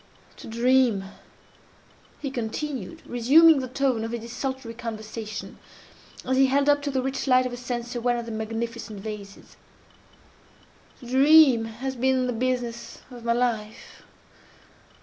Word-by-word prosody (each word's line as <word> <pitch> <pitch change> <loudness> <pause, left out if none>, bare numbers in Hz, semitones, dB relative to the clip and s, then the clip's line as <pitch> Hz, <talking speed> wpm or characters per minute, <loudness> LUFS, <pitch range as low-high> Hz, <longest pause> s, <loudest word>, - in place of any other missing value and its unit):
"To - - -11
dream," 235 -3 +2 1.2
he 275 - -3
continued, 265 - -5
resuming 285 +6 +5
the 260 - -4
tone 255 -3 0
of 225 - -4
his 235 - -3
desultory 245 +1 -5
conversation, 220 -2 -7 0.7
as 260 0 0
he 270 0 +5
held 280 +2 +2
up 290 0 +4
to 285 - -3
the 265 -2 -1
rich 270 +1 -3
light 255 -1 +4
of 250 - -4
a - - -5
censer 240 0 -4
one 240 0 +1
of 235 - -4
the 230 - -7
magnificent 225 0 -5
vases—"to 205 +3 -14
dream 265 -1 +6
has 250 +4 -5
been 260 +1 +1
the 250 - -1
business 240 -1 -3
of 240 -2 -10
my 235 0 +1
life. 230 -3 -3
245 Hz, 140 wpm, -25 LUFS, 230-265 Hz, 1.2 s, dream